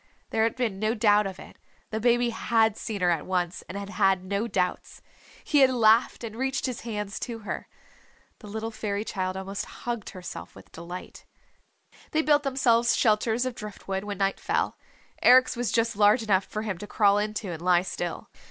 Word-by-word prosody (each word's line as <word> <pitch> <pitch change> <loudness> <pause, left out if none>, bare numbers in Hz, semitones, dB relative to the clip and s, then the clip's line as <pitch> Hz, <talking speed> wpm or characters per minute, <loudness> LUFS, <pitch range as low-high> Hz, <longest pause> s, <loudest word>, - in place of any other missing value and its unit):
There 220 - +1
had 230 - -1
been 230 -7 -2
no 215 +2 0
doubt 210 -2 +4
of 190 -1 -7
it - - -13 0.3
the 220 - -2
baby 240 +1 +3
had 225 -1 +2
seen 215 -4 -5
her 175 -1 +3
at 165 -3 -1
once, 180 -1 -1
and 190 - -5
had 200 0 -6
had 195 -3 +2
no 200 +4 -2
doubts. 180 -5 -2 0.4
He 295 - +2
had 265 -1 +7
laughed 230 -1 +3
and 220 -2 -6
reached 265 +2 -1
his 255 -3 -3
hands 210 -3 -4
to 230 -3 -5
her. - - -4 0.7
The 215 - -12
little 220 +2 -4
Fairy 210 -1 -3
Child 185 -2 -3
almost 195 +1 -4 0.2
hugged 235 -4 -3
herself 185 -1 -9
with - - -15
delight.... 175 +2 -9 0.9
They 315 +1 +2
built 295 -1 +4
themselves 240 -4 +2
shelters 220 +2 +2
of 255 - -2
drift 210 -3 -9
wood 195 0 -2
when 205 -1 -5
night 195 0 0
fell. - - -1 0.5
Eric's 255 +1 +6
was 240 -1 -1
just 230 -1 +1
large 210 +3 +4
enough 200 -3 +2
for 215 - -5
him 200 -6 -3
to 205 - -7
crawl 205 -1 +3
into 210 -2 -3
and 165 -1 -6
lie 180 0 +3
still. 175 -2 -4
215 Hz, 195 wpm, -27 LUFS, 195-235 Hz, 0.9 s, had